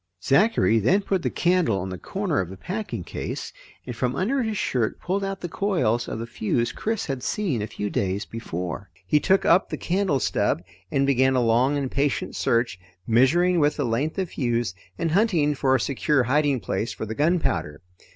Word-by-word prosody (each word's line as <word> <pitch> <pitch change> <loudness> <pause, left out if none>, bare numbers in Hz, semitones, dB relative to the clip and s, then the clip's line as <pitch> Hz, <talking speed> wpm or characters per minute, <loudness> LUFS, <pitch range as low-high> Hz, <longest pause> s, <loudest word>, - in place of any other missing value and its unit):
Zachary 140 - +3
then 180 - +3
put 190 -2 0
the - - 0
candle 175 - +2
on 95 +1 -4
the 95 - -5
corner 190 - -2
of 90 -1 -3
a 95 - -9
packing 180 - -4
case - - -5 0.3
and 125 - -6
from 125 +2 -1
under 240 - 0
his 220 -3 -2
shirt 120 -10 -1
pulled 195 +2 -2
out 195 -1 -4
the 175 - -3
coils 145 - 0
of - - -4
the 115 - -4
fuse 115 0 -1
Chris 220 -1 -2
had 135 -3 -3
seen 165 - -1
a 105 - -3
few 105 - -4
days 100 +1 -1
before. 90 -4 -5 0.2
He 150 - +3
took 190 +5 +2
up 175 +3 +4
the - - -3
candle 180 -6 0
stub 90 -6 0 0.3
and 135 +5 +1
began 130 -1 +3
a - - +3
long 125 +5 +3
and 135 -2 -2
patient 140 0 -1
search, 115 -5 0 0.3
measuring 165 - +3
with 150 0 +2
the 145 - 0
length 125 - -1
of 190 -3 -1
fuse, 120 - -1 0.2
and 165 - -1
hunting 170 -6 +3
for 135 -1 +2
a - - +2
secure 140 0 +1
hiding 140 0 +1
place 100 +4 -2
for - - -5
the 110 - -4
gunpowder. 145 - 0
135 Hz, 200 wpm, -24 LUFS, 115-175 Hz, 0.3 s, up